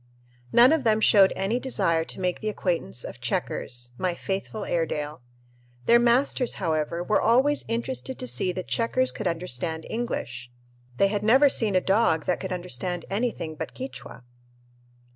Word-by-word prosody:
None 245 Hz, +3 st, +7 dB
of 320 Hz, -4 st, +1 dB
them 220 Hz, -2 st, +3 dB
showed 200 Hz, -3 st, +6 dB
any 200 Hz, +6 st, -1 dB
desire 190 Hz, -11 st, 0 dB
to -, -, -7 dB
make 180 Hz, -1 st, -1 dB
the 215 Hz, -, -2 dB
acquaintance 170 Hz, -, -2 dB
of -, -, -9 dB
"Checkers," 120 Hz, 0 st, -2 dB
my 180 Hz, -2 st, -1 dB
faithful 195 Hz, +3 st, -4 dB
Airedale. 150 Hz, -4 st, -2 dB, 0.6 s
Their 235 Hz, 0 st, +6 dB
masters, 245 Hz, +1 st, +2 dB
however, 165 Hz, -1 st, -1 dB
were 210 Hz, +4 st, +1 dB
always 265 Hz, +6 st, +3 dB
interested 255 Hz, +3 st, -3 dB
to 255 Hz, -, -5 dB
see 185 Hz, -6 st, -1 dB
that 185 Hz, 0 st, -6 dB
"Checkers" 255 Hz, +2 st, +1 dB
could 215 Hz, -, -4 dB
understand 160 Hz, -1 st, -2 dB
English. 130 Hz, -, -4 dB, 0.5 s
They 195 Hz, -, +4 dB
had 205 Hz, 0 st, -1 dB
never 260 Hz, +7 st, +5 dB
seen 215 Hz, -6 st, 0 dB
a 185 Hz, -, +4 dB
dog 190 Hz, -6 st, +2 dB
that 180 Hz, -, 0 dB
could 190 Hz, -, -5 dB
understand 180 Hz, 0 st, -3 dB
anything 205 Hz, -6 st, -2 dB
but 155 Hz, -, -7 dB
Quichua! 265 Hz, -, -8 dB
195 Hz, 160 wpm, -25 LUFS, 170-235 Hz, 0.6 s, None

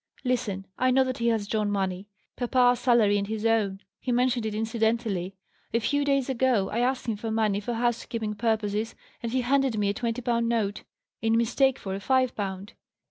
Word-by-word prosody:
"Listen. 235 Hz, -7 st, -1 dB
I 255 Hz, -, +3 dB
know 265 Hz, +1 st, +4 dB
that 255 Hz, -1 st, -3 dB
he 235 Hz, -, +1 dB
has 220 Hz, -3 st, +1 dB
drawn 210 Hz, -1 st, 0 dB
money 190 Hz, -1 st, -2 dB, 0.3 s
papa's 245 Hz, 0 st, +3 dB
salary 220 Hz, -5 st, +4 dB
and 200 Hz, -, -3 dB
his 220 Hz, +1 st, -3 dB
own: 210 Hz, -4 st, +1 dB, 0.2 s
he 255 Hz, -, -3 dB
mentioned 245 Hz, -2 st, +1 dB
it 210 Hz, -, -4 dB
incidentally. 220 Hz, -4 st, -1 dB, 0.4 s
A -, -, +4 dB
few 285 Hz, +5 st, +1 dB
days 275 Hz, -2 st, +1 dB
ago 250 Hz, -6 st, +1 dB
I 230 Hz, -, -1 dB
asked 255 Hz, +2 st, 0 dB
him 225 Hz, -, 0 dB
for 225 Hz, +2 st, -4 dB
money 215 Hz, -2 st, +1 dB
for 235 Hz, +3 st, -3 dB
housekeeping 230 Hz, -2 st, -1 dB
purposes, 215 Hz, 0 st, -1 dB, 0.3 s
and 230 Hz, -, -3 dB
he 260 Hz, +1 st, +1 dB
handed 265 Hz, -1 st, +1 dB
me 205 Hz, -1 st, +1 dB
a -, -, +1 dB
twenty 235 Hz, +2 st, -3 dB
pound 235 Hz, -1 st, +1 dB
note, 210 Hz, -4 st, 0 dB, 0.4 s
in 225 Hz, 0 st, +2 dB
mistake 260 Hz, +3 st, +2 dB
for 190 Hz, -, -5 dB
a 195 Hz, -, -3 dB
five 255 Hz, +4 st, +1 dB
pound. 195 Hz, +1 st, -5 dB
225 Hz, 195 wpm, -27 LUFS, 205-245 Hz, 0.4 s, know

